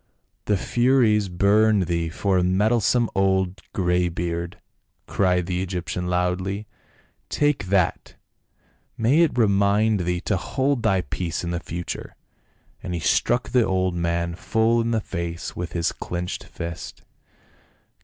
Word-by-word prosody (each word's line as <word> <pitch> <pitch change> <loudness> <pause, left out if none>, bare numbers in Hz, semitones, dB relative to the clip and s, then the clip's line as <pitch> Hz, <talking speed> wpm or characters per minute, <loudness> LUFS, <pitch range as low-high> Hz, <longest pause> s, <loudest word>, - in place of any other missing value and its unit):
" - - -48
The 105 - +2
furies 120 -3 +2
burn 105 +3 +3
thee 85 -2 -1
for 95 +3 0
a - - +1
meddlesome 110 +5 +2
old 95 -1 +1
grey 90 -1 +1
beard 85 0 -4 0.2
!" - - -49
cried 90 -2 +1
the 90 0 -2
Egyptian 90 -1 -3
loudly, 90 +3 -1 0.3
" - - -32 0.3
take 145 -8 +1
that! 95 -2 0 0.8
may 120 +8 +3
it 165 -6 +3
remind 105 0 +3
thee 90 0 -1
to 95 0 0
hold 130 - -1
thy 100 -5 +2
peace 85 -1 -4
in 85 - -3
the 85 - -2
future," 85 0 -6 0.7
and 90 - -4
he - - -2
struck 120 +9 +1
the 125 -2 +3
old 95 -2 0
man 85 0 -1
full 110 +6 +1
in 115 - -1
the 115 -2 +1
face 85 -3 -5
with 85 0 -5
his 85 -2 0
clenched 90 0 -5
fist. 85 0 -7
95 Hz, 145 wpm, -23 LUFS, 85-110 Hz, 0.8 s, burn